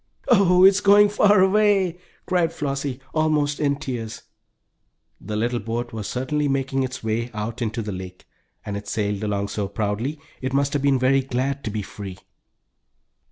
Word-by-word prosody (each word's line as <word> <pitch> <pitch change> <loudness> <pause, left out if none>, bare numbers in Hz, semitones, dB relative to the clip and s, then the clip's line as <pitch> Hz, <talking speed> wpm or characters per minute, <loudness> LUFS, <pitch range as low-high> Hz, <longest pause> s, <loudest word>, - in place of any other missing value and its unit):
"Oh, 185 -6 +5
it's 195 +1 +6
going 205 +1 +6
far 205 -1 +4
away!" 190 -3 +3 0.3
cried 175 -3 +1
Flossie; 140 -4 -3
almost 150 -2 +1
in 140 -2 +1
tears. 115 -6 -6 1.0
The 105 +2 -6
little 120 +3 0
boat 115 +2 -4
was 110 -2 -4
certainly 145 +4 -1
making 135 -1 0
its 125 -2 -4
way 115 +2 -1
out 110 +3 -4
into 115 0 -2
the 105 - -4
lake, 90 -1 -8 0.4
and 105 - -4
it 100 0 -6
sailed 105 0 -2
along 100 -1 -1
so 105 -2 -2
proudly, 110 +8 -2 0.2
it 130 0 -3
must 140 0 +1
have 145 - 0
been 140 -1 +3
very 130 +2 +3
glad 135 +2 -2
to - - -1
be 105 0 -3
free. 95 -2 -8
130 Hz, 165 wpm, -23 LUFS, 110-150 Hz, 1.0 s, it's